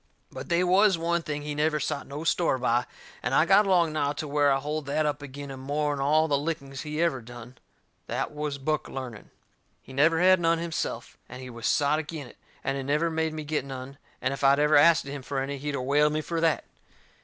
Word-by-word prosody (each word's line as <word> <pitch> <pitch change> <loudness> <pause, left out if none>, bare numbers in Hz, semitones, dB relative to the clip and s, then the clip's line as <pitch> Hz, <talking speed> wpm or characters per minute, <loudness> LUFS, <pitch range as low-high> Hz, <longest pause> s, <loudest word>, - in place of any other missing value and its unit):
But - - -8
they 170 +1 +3
was 190 +1 +4
one 170 +1 0
thing 150 -2 -4
he 150 0 -4
never 150 +1 +1
sot 145 - -3
no 145 +3 -6
store 165 -3 +2
by, 125 -1 +1 0.3
and 125 +2 -1
I - - +5
got 195 +3 +5
along 170 -4 +3
now 145 -2 0
to 150 +1 -5
where 145 0 +3
I 135 - +3
hold 150 +1 -4
that 150 +2 0
up 145 -1 -1
agin 140 0 -8
him 135 - -8
more'n 145 +1 -1
all 155 +3 +3
the 140 -2 +1
lickings 140 -3 -4
he 150 0 -5
ever 155 -7 0
done. 120 +1 -12 0.5
That - - -2
was 150 -1 -4
book 155 +2 -2
learning. 125 -6 -7 0.5
He 130 - -14
never 160 +4 +3
had 185 +1 +5
none 165 0 +2
himself, 165 -1 -4
and 125 - -9
he 130 -1 -8
was 115 0 -4
sot 145 +1 +2
agin 155 -2 -6
it, - - -15 0.3
and 135 0 -1
he - - -3
never 150 +5 +1
made 160 0 -1
me 155 - -4
get 150 -2 -2
none, 135 +1 -8 0.2
and 135 - +1
if 140 - -6
I'd 135 0 +6
ever 150 +1 +3
asted 150 -1 +5
him 140 -1 -6
for 135 +2 -5
any 135 +1 -3
he'd 145 +1 -3
of 130 - -3
whaled 150 +3 +3
me 155 - 0
fur 165 +1 -3
that. 165 -3 +2
150 Hz, 235 wpm, -27 LUFS, 135-160 Hz, 0.5 s, I'd